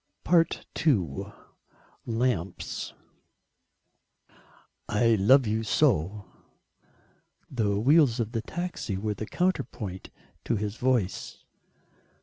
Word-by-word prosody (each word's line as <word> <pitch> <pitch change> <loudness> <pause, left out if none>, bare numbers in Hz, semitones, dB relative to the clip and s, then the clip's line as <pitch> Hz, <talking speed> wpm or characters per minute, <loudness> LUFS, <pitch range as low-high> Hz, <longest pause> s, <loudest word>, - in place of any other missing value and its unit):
II: 140 - +1 0.8
LAMPS 115 -6 -2 2.0
"I 110 +3 +3
love 120 +6 +5
you 110 +1 0
so." 105 - +1 1.3
The 105 -5 0
wheels 135 0 +4
of 115 -1 -1
the 115 - -2
taxi 175 - -4
were 105 +2 -2
the 105 +2 -6
counterpoint 130 - -2 0.4
to - - +1
his 105 +1 -3
voice. 125 -7 -1
110 Hz, 85 wpm, -27 LUFS, 100-130 Hz, 2.0 s, love